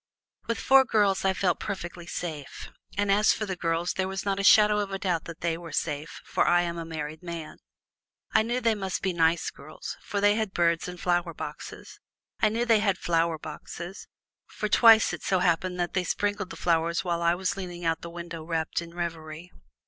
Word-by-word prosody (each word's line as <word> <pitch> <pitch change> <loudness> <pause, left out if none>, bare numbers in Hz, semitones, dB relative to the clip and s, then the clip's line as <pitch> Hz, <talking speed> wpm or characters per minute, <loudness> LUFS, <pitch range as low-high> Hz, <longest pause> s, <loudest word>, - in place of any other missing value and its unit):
With 230 - -1
four 270 0 +6
girls 205 -5 +2
I 190 - +3
felt 185 -2 0
perfectly 175 -4 -6
safe, 155 -6 -6 0.3
and 205 -1 +2
as 210 +2 +5
for 215 - -3
the 190 -2 -3
girls 170 0 -1
there 190 0 -1
was 195 +1 -4
not 200 -1 0
a - - -1
shadow 210 0 +6
of 205 -1 -2
a 195 - -2
doubt 180 -4 -1
that 170 -1 -9
they 170 -1 -1
were 170 -2 -9
safe, 150 +1 -3
for - - +1
I 175 0 +4
am 170 -1 -3
a 165 - -5
married 155 -1 -6
man. 170 -3 -7 0.7
I 220 - +5
knew 240 +3 -1
they 230 -2 +2
must 195 -3 -3
be 190 -2 0
nice 165 0 +2
girls, 155 +3 -9
for 205 - -3
they 205 +1 +5
had 215 -2 -2
birds 170 0 +2
and 180 0 -7
flower 175 -2 0
boxes. - - -8 0.4
I 215 - +5
knew 230 +3 -1
they 225 -3 +4
had 200 -3 +1
flower 165 -2 +1
boxes, 170 +4 -8 0.4
for 215 - -3
twice 225 0 +6
it - - -5
so 190 - +1
happened 180 +1 +1
that 175 0 -1
they 185 - +1
sprinkled 205 0 -1
the - - -8
flowers 170 0 +1
while 170 -2 -1
I 170 0 +3
was 185 +1 -1
leaning 175 -3 -6
out 165 0 +1
of - - -38
the 170 - -7
window 170 -1 -7
wrapped 165 0 -2
in 170 0 -11
reverie. 165 0 -5
175 Hz, 215 wpm, -27 LUFS, 165-200 Hz, 0.7 s, four